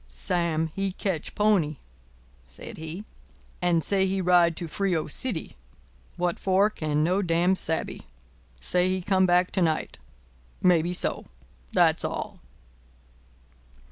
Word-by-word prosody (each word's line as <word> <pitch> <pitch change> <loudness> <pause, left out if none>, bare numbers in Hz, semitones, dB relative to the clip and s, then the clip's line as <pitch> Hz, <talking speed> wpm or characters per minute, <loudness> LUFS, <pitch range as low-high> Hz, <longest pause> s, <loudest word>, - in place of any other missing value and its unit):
"Sam, 160 - -1
he 195 -1 -2
catch 185 -5 -3
pony," 190 -9 +2 0.7
said - - -9
he, 160 +5 -6 0.6
"and 175 -2 +2
say 190 -1 +2
he 190 +1 -1
ride 175 -2 +4
to 170 - -4
Frio 175 0 0
City. 180 - -4 0.6
What 175 -1 -1
for 195 +3 +3
no 155 +4 +1
can 190 - -4
damn 170 +3 +3
sabe. 160 -3 -3 0.6
Say 180 - +1
he 185 -1 -1
come 190 -1 +3
back 180 +1 +3
to 190 - 0
night. 160 - 0 0.6
Maybe 175 -1 +4
so. - - -3 0.5
That - - +4
all." - - -4
175 Hz, 125 wpm, -26 LUFS, 160-190 Hz, 0.7 s, ride